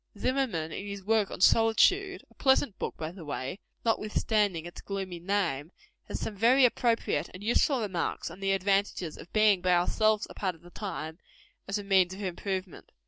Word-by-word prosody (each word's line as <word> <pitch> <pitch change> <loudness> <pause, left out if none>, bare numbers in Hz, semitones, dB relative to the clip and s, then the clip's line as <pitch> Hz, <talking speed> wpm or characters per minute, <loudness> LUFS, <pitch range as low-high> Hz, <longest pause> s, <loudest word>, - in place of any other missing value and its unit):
Zimmerman, 230 -11 -1
in 200 - -6
his 200 -1 -6
work 215 0 +2
on - - -7
Solitude 375 - +4
a - - -20
pleasant 265 -6 +2
book, - - -4
by 160 0 -4
the 180 -1 -11
way, 145 +4 -4 0.3
notwithstanding 210 -5 +1
its 175 - -9
gloomy 190 -3 -5
name 175 -5 -1 0.4
has - - -4
some 210 - -4
very 245 +6 +5
appropriate 230 - +1
and 185 - -9
useful 240 +4 +2
remarks 190 -5 -2
on - - -11
the 195 0 +1
advantages 195 -3 0
of - - -12
being 215 -3 +4
by 180 0 +3
ourselves 215 +4 +2
a - - -11
part 185 -3 -2
of 165 - -21
the 175 - -14
time, 165 -6 -6 0.5
as 195 +1 -1
a 205 - -5
means 190 -2 +3
of 200 - -7
improvement. 185 0 -4
195 Hz, 185 wpm, -29 LUFS, 175-215 Hz, 0.5 s, very